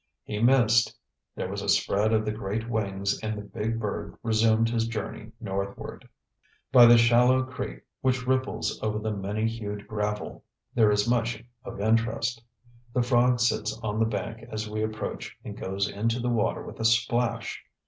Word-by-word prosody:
He 105 -1 -4
missed; 120 -2 +4 0.4
there - - -3
was 100 +1 -4
a 100 - -3
spread 100 +2 +2
of 110 -1 +2
the 105 - 0
great 110 +1 -3
wings 100 -3 -1
and 110 -1 -3
the 105 - -6
big 115 +2 -3
bird 105 -3 -4
resumed 115 0 +3
his 115 -1 0
journey 110 0 -5
northward. 100 -3 -5 0.6
By 125 -2 +9
the 120 0 +8
shallow 120 +2 +5
creek 130 - -6 0.2
which 125 -1 +1
ripples 130 +1 0
over 105 -1 -1
the 110 0 -2
many 105 +2 -1
hued 105 -3 -5
gravel 105 -1 -3 0.3
there 110 -3 +5
is 105 +1 +2
much 115 -1 0 0.2
of - - -8
interest. 115 +2 +1 0.5
The 125 - +3
frog 125 0 +3
sits 110 -2 +1
on 105 0 -1
the 115 - +4
bank 110 +2 -4
as 110 0 -3
we 110 0 -3
approach 110 0 -4
and - - -6
goes 95 +1 -2
into 115 +5 -1
the 125 +1 -1
water 115 -3 0
with - - -10
a 115 - -1
splash. 115 +1 +1
110 Hz, 170 wpm, -27 LUFS, 105-120 Hz, 0.6 s, By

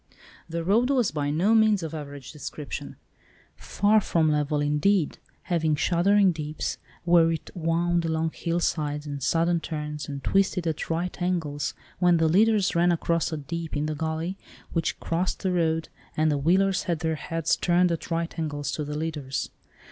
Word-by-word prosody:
The 165 0 -3
road 225 +8 +3
was 250 -6 +2
by 145 -2 -1
no 175 +9 +2
means 215 -4 +4
of 160 -1 -5
average 145 -4 -7
description, 150 -1 -7 0.6
far 210 +2 +2
from 160 -5 +2
level, 150 0 +1
indeed, 150 +4 +1 0.2
having 160 -3 +1
shuddering 190 +5 +3
deeps, 155 -1 -4 0.2
where 170 -1 +5
it 160 -1 -5
wound 170 0 +1
along 160 0 0
hillsides, 155 -3 -1
and 145 -1 -5
sudden 170 +4 +2
turns, 150 -2 -5
and 140 -2 -6
twisted 195 0 +1
at 160 -2 -2
right 175 +3 -2
angles, 160 -5 -1 0.2
when 175 -1 +4
the 165 0 +3
leaders 205 +3 +3
ran 175 +1 +4
across 170 0 0
a 160 - -2
dip 160 +2 -4
in 145 - -1
the 155 - -1
gully, 160 +5 -3 0.3
which 165 - -1
crossed 175 +5 -2
the 190 - +1
road, 165 -2 0 0.3
and 155 0 +3
the 145 - +1
wheelers 185 +5 +2
had 170 -3 -1
their 160 -1 0
heads 165 +1 -1
turned 175 0 +2
at 165 - -4
right 165 0 -2
angles 145 -2 -2
to 150 - -3
the 150 0 -4
leaders. 150 -4 -3
165 Hz, 170 wpm, -26 LUFS, 150-175 Hz, 0.6 s, where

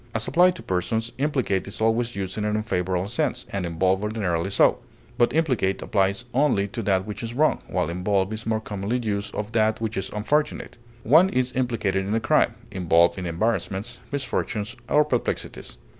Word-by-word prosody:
As 110 - 0
applied 180 +2 +4
to - - -9
persons, 110 +5 -1
implicate 130 -10 0
is 100 - -6
always 115 +2 +1
used 95 -1 -3
in 105 - -2
an 105 0 0
unfavorable 95 -3 -1
sense, - - -1
and 95 -3 -2
involve 95 +3 +1
ordinarily 95 -5 -1
so; - - +3 0.4
but 120 0 +4
implicate 130 -11 +1
applies 100 +3 0
only 125 -7 +2
to 115 +3 -4
that 95 -2 +1
which 105 - -6
is 115 0 -5
wrong, 155 +3 +3
while - - -1
involve 95 +3 0
is 110 0 -6
more 110 -1 +1
commonly 105 +2 -3
used 105 -4 -3
of 105 +1 -4
that 110 -1 +2
which 115 -1 -3
is 95 0 -2
unfortunate; 150 +9 -1 0.3
one 160 - +6
is 125 -5 0
implicated 115 -7 0
in 105 - 0
a - - +2
crime, - - +2 0.2
involved 85 0 +3
in 90 - -4
embarrassments, 105 +4 -2
misfortunes, 120 -5 -2
or 150 0 +4
perplexities. 125 -5 -3
105 Hz, 180 wpm, -24 LUFS, 95-120 Hz, 0.4 s, one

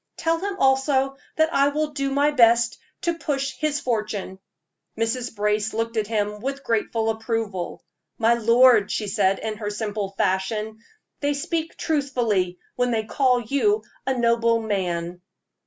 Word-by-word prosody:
Tell 330 0 +1
him 395 +2 -3
also 270 -1 +2 0.2
that 315 +1 +2
I 275 +1 +4
will 300 +1 -1
do 275 -2 -2
my 285 +2 +2
best 235 -3 +4 0.2
to 340 - 0
push 275 -3 -1
his 300 -1 0
fortune." 215 -6 -3 0.6
Mrs. 230 +1 -2
Brace 210 +1 0
looked 230 +1 -2
at 215 -2 0
him 210 -1 -1
with 275 +4 -4
grateful 225 0 0
approval. 220 -5 -3 0.3
"My 230 0 +4
lord," 235 -2 +5
she 215 - -2
said, 195 -1 +2
in 220 -1 -4
her 205 -1 -3
simple 210 -1 -3
fashion, 210 +3 -1 0.4
"they 285 0 0
speak 325 +3 -3
truthfully 240 - 0 0.2
when 245 0 +1
they 225 -2 0
call 250 +2 +2
you 280 - +1 0.2
a 265 -1 +1
noble 230 -1 +3
man." 180 -5 -2
230 Hz, 150 wpm, -24 LUFS, 210-275 Hz, 0.6 s, lord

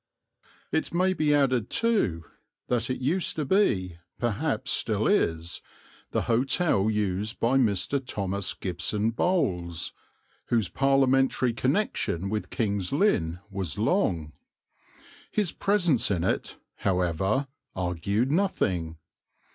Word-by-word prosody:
It 160 - 0
may 185 +2 +3
be 155 -4 +1
added, 130 -6 +2
too, 150 - +1 0.4
that 120 -1 0
it 130 - -2
used 160 +7 0
to 155 - -2
be, 95 - +1 0.2
perhaps 120 -4 -1
still - - 0
is, 80 0 0 0.5
the - - -1
hotel 120 - +2
used 105 0 -1
by 130 +4 +3
Mr. 125 +4 +1
Thomas 100 -4 -3
Gibson 100 +5 -1
Bowles, 90 - -1 0.5
whose 110 -6 +1
Parliamentary 135 -2 +2
connection 115 - 0
with 110 0 -2
King's 100 -5 -1
Lynn 90 - +1
was 95 -7 -3
long. 80 -3 0 1.0
His 205 -6 0
presence 175 - +2
in 90 -5 0
it, 95 - -1 0.2
however, 95 - 0 0.3
argued 95 +7 -1
nothing. 95 - 0
110 Hz, 110 wpm, -27 LUFS, 90-140 Hz, 1.0 s, may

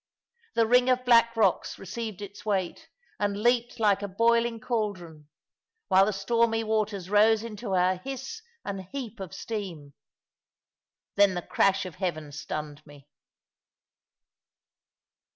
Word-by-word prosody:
The 230 - +4
ring 250 +2 +4
of 255 0 +2
black 230 -1 +5
rocks 200 -5 +1
received 205 +1 -6
its 205 +1 -10
weight, 195 -4 -2 0.3
and 205 -1 0
leaped 240 +1 +1
like 205 -2 +3
a 205 - -3
boiling 230 +3 +2
caldron, 185 -10 -4 0.6
while 190 0 +5
the - - +1
stormy 225 +3 +1
waters 215 -4 -1
rose 215 +2 +4
into 215 -3 -4
a 180 0 +2
hiss 270 - -6 0.2
and 195 -1 -4
heap 235 0 -7
of 190 -4 -6
steam. 175 -11 -6 1.2
Then 200 -2 +5
the 175 - -3
crash 195 0 +2
of 180 -4 -8
heaven 155 -6 -3
stunned 150 +1 -6
me. 145 -2 -16
205 Hz, 130 wpm, -27 LUFS, 185-230 Hz, 1.2 s, black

